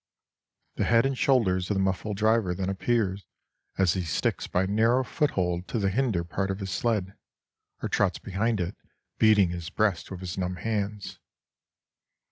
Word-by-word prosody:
The -, -, +1 dB
head 115 Hz, +1 st, +4 dB
and 135 Hz, 0 st, 0 dB
shoulders 95 Hz, -10 st, +2 dB
of 105 Hz, -, +1 dB
the -, -, 0 dB
muffled 95 Hz, +2 st, -1 dB
driver 110 Hz, -4 st, +2 dB
then 95 Hz, +1 st, -2 dB
appear, 100 Hz, -1 st, 0 dB, 0.6 s
as 95 Hz, -3 st, +3 dB
he 95 Hz, -, -1 dB
sticks 80 Hz, -3 st, -1 dB
by 90 Hz, +1 st, +1 dB
narrow 115 Hz, +6 st, +3 dB
foothold 90 Hz, -, -1 dB
to 90 Hz, -, -2 dB
the 100 Hz, -3 st, +1 dB
hinder 110 Hz, -6 st, +1 dB
part 95 Hz, +3 st, -2 dB
of 95 Hz, -, -2 dB
his 95 Hz, -2 st, -4 dB
sled, 105 Hz, -4 st, -1 dB, 0.7 s
or -, -, 0 dB
trots -, -, +1 dB
behind 110 Hz, +3 st, -1 dB
it 90 Hz, +2 st, -2 dB, 0.4 s
beating 105 Hz, -5 st, +5 dB
his 85 Hz, -1 st, -5 dB
breast 100 Hz, -3 st, 0 dB
with 95 Hz, -2 st, -7 dB
his 90 Hz, 0 st, -5 dB
numb 90 Hz, 0 st, -2 dB
hands. 105 Hz, +1 st, -3 dB
95 Hz, 165 wpm, -27 LUFS, 90-110 Hz, 0.7 s, beating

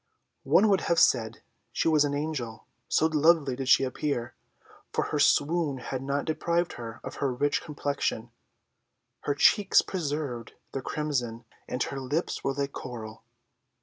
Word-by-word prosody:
One 220 Hz, -, +5 dB
would 195 Hz, -3 st, +3 dB
have 170 Hz, -, +3 dB
said 115 Hz, -3 st, +2 dB, 0.3 s
she -, -, 0 dB
was 155 Hz, -2 st, +5 dB
an 145 Hz, 0 st, -1 dB
angel, 145 Hz, -7 st, -4 dB, 0.2 s
so -, -, +3 dB
lovely 155 Hz, -3 st, +3 dB
did 135 Hz, 0 st, -4 dB
she -, -, +6 dB
appear 130 Hz, -2 st, -2 dB, 0.6 s
for -, -, 0 dB
her -, -, -2 dB
swoon 150 Hz, -2 st, +2 dB
had 130 Hz, +1 st, -5 dB
not 140 Hz, +1 st, -2 dB
deprived 170 Hz, +2 st, 0 dB
her 115 Hz, 0 st, -8 dB
of -, -, -7 dB
her 140 Hz, -, 0 dB
rich 145 Hz, +4 st, 0 dB
complexion: 145 Hz, -2 st, -3 dB, 1.0 s
her 145 Hz, -, +2 dB
cheeks 200 Hz, +6 st, +5 dB
preserved 145 Hz, -, -4 dB, 0.2 s
their 135 Hz, -, -3 dB
crimson, 125 Hz, -7 st, -3 dB, 0.2 s
and 125 Hz, 0 st, -1 dB
her 135 Hz, -, -4 dB
lips 145 Hz, +6 st, -2 dB
were 135 Hz, -, 0 dB
like 140 Hz, 0 st, -2 dB
coral. 115 Hz, -4 st, -8 dB
140 Hz, 150 wpm, -28 LUFS, 125-155 Hz, 1.0 s, she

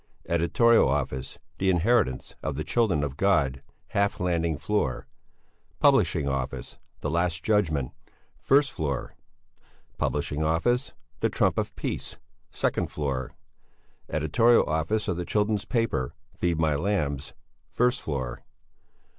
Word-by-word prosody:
Editorial 85 Hz, -, +4 dB
office, 65 Hz, -2 st, -2 dB, 0.2 s
The 95 Hz, -, +2 dB
Inheritance 90 Hz, -, +1 dB
of 75 Hz, -1 st, -3 dB
the 75 Hz, -, -2 dB
Children 90 Hz, -4 st, +1 dB
of 70 Hz, -1 st, -4 dB
God, 75 Hz, -10 st, +2 dB, 0.3 s
half 100 Hz, 0 st, 0 dB
landing 85 Hz, -4 st, 0 dB
floor. 70 Hz, -12 st, -1 dB, 0.7 s
Publishing 70 Hz, -, +4 dB
office, 65 Hz, -2 st, -4 dB, 0.2 s
The 75 Hz, -, -2 dB
Last 85 Hz, 0 st, 0 dB
Judgment, 80 Hz, -, +1 dB, 0.5 s
first 140 Hz, 0 st, +3 dB
floor. 70 Hz, -4 st, -3 dB, 0.9 s
Publishing 75 Hz, +2 st, -1 dB
office, 120 Hz, -, +1 dB, 0.3 s
The -, -, +2 dB
Trump -, -, +1 dB
of -, -, -3 dB
Peace, -, -, -4 dB, 0.3 s
second -, -, -1 dB
floor. 65 Hz, -4 st, -3 dB, 0.8 s
Editorial 115 Hz, +11 st, +3 dB
office 85 Hz, +8 st, 0 dB
of 90 Hz, -4 st, -1 dB
the 90 Hz, -, -2 dB
children's 105 Hz, +2 st, 0 dB
paper, 115 Hz, -, -1 dB, 0.2 s
Feed 85 Hz, -2 st, 0 dB
My 80 Hz, -1 st, +2 dB
Lambs, 75 Hz, -5 st, -1 dB, 0.4 s
first 125 Hz, +1 st, +1 dB
floor. 65 Hz, -5 st, -4 dB
80 Hz, 120 wpm, -27 LUFS, 70-105 Hz, 0.9 s, Editorial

